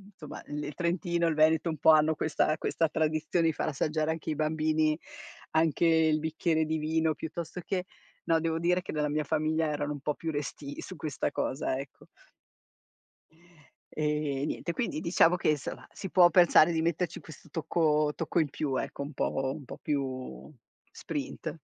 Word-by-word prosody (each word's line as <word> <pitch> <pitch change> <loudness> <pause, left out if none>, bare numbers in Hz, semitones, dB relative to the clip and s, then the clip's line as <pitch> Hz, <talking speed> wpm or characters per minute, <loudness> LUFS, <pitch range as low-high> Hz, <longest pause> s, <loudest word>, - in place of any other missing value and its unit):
somma 150 - -9
l 150 0 -5
il 150 - -5
Trentino 170 -1 0
e - - +3
il 155 - -1
Veneto 160 +2 +3
un 160 - -3
po' 160 - +6
hanno 155 0 +4
questa 155 0 +1
questa 165 0 0
tradizione 155 +2 +1
di 160 - +2
far - - -2
assaggiare 155 +2 0
anche 160 -1 -5
ai - - -1
bambini 155 0 +1 0.5
anche 160 +1 +2
il 160 -1 +4
bicchiere 160 0 0
di 160 +1 -1
vino 160 +1 +1
piuttosto 165 +3 -6
che 185 -2 -2 0.4
no, 165 0 +3
devo 165 0 -1
dire 180 +2 +2
che - - -6
nella 150 -1 0
mia 150 +1 0
famiglia 155 +1 0
erano 150 0 -2
un 145 - -7
po' 150 +1 -1
più 165 - -5
restii 145 -1 -5
su 185 - -8
questa 150 -2 -2
cosa, 130 -1 -1
ecco. 135 -1 -10 1.9
Ehm, 150 -2 -1
niente, 170 - -3
quindi 225 -7 -2
diciamo 170 0 +4
che, 165 - +2
insomma 150 - -4
si 195 - -7
può 175 -2 +6
pensare 170 -1 +6
di 160 -1 0
metterci 170 +1 -1
questo 160 0 -13
tocco 155 -2 +1
tocco 165 +1 -1
in 155 -4 +1
più, 140 -2 -2
ecco, - - -4
un 140 - -5
po' 135 -1 -1
un 145 -3 -9
po' - - -9
più 135 -3 -4 0.4
sprint. - - -5
155 Hz, 180 wpm, -29 LUFS, 150-165 Hz, 1.9 s, po